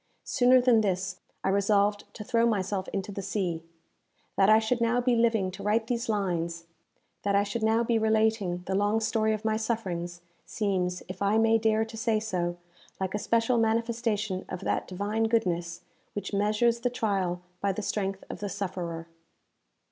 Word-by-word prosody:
Sooner 255 +1 +4
than 245 -3 +5
this, 190 -2 -1 0.2
I - - +1
resolved 200 +1 +2
to 215 - -6
throw 235 0 +2
myself 195 -3 -1
into 195 0 -4
the 200 - -5
sea. 185 -4 -2 0.7
That 195 +1 +4
I 215 - +8
should 225 +2 0
now 235 +1 +2
be 245 0 +2
living 225 -5 +2
to 190 - -9
write 215 +3 +1
these 235 0 -2
lines 170 -5 -1 0.6
that 200 0 +1
I 200 - +4
should 205 +3 -3
now 220 +1 +3
be 230 -1 +1
relating 220 -5 +1
the 190 - -2
long 205 +3 +2
story 220 0 +1
of 215 0 -3
my 220 0 +2
sufferings 180 -7 -3 0.2
seems, 185 -4 -1
if 185 +1 -8
I 200 +2 +3
may 225 0 +4
dare 220 0 +2
to 225 0 -10
say 225 -1 +1
so, 175 -5 -2 0.4
like 190 -1 -2
a 210 - -1
special 230 +3 +2
manifestation 225 -3 0
of 185 - -5
that - - -1
divine 205 +4 -1
goodness 175 -6 0 0.3
which 205 - -5
measures 215 +4 +2
the 245 +1 0
trial 195 -7 -1 0.2
by 200 +1 +1
the 205 +2 -4
strength 195 -1 -2
of - - -7
the 205 - -3
sufferer. 175 -4 -4
210 Hz, 180 wpm, -28 LUFS, 190-225 Hz, 0.7 s, I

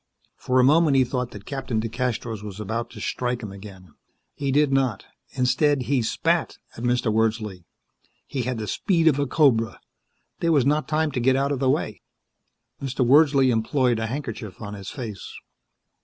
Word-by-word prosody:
For 130 0 0
a - - +6
moment 150 +1 +4
he 130 - +5
thought 125 -1 -2
that 100 -3 -11
Captain 135 -5 -3
DeCastros 115 -1 -3
was 105 -1 -8
about 115 +3 -3
to 115 - -11
strike 125 +2 -2
him 105 - -6
again. 95 -4 -12 0.4
He 140 -1 -2
did 145 0 +3
not. 130 -7 0 0.3
Instead 130 +2 +2
he 135 0 +1
spat 110 - 0 0.2
at 115 - -8
Mr. 120 -2 +1
Wordsley. 110 -5 -1 0.6
He 130 - -3
had 125 0 -2
the 110 - -4
speed 165 - +1
of 145 -3 +4
a 140 - 0
cobra. 115 -9 +2 0.6
There 170 - +1
was 140 -6 +3
not 150 +2 +1
time 155 0 0
to 130 - -2
get 130 +2 +3
out 140 +1 +1
of 140 - -1
the 130 -1 +2
way. - - -1 0.8
Mr. 135 -2 -1
Wordsley 140 -1 +5
employed 120 +1 +1
a 110 - -2
handkerchief 120 -6 -6
on 105 -2 -7
his 100 -1 -7
face. 115 -9 -7
125 Hz, 180 wpm, -24 LUFS, 110-140 Hz, 0.8 s, a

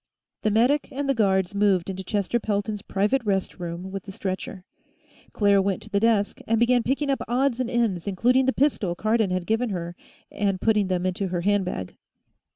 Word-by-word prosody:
The 215 - +1
medic 245 +8 +2
and 280 +1 -3
the 275 - +3
guards 190 -5 +1
moved 200 -4 +2
into 190 0 -5
Chester 205 +4 -1
Pelton's 210 -1 -2
private 205 +8 0
rest 195 -4 -1
room 175 +2 -5
with 195 -1 -6
the 195 - -7
stretcher. 190 -1 -5 0.7
Claire 200 -2 +3
went 195 -1 -1
to 215 - -10
the 200 - +2
desk 215 -2 +1
and 225 0 +2
began 240 +1 +4
picking 275 +4 0
up 270 - -1
odds 255 +1 +1
and 255 -2 -1
ends, 225 -8 0
including 250 +7 +2
the - - +4
pistol 250 -11 0
Cardon 215 +1 +1
had 185 -1 -2
given 225 +4 0
her, 175 -3 -4 0.4
and 200 -2 -1
putting 210 -2 +2
them 185 -1 -1
in 185 - +1
her 175 -1 -2
handbag. 185 - -1
205 Hz, 190 wpm, -25 LUFS, 190-235 Hz, 0.7 s, began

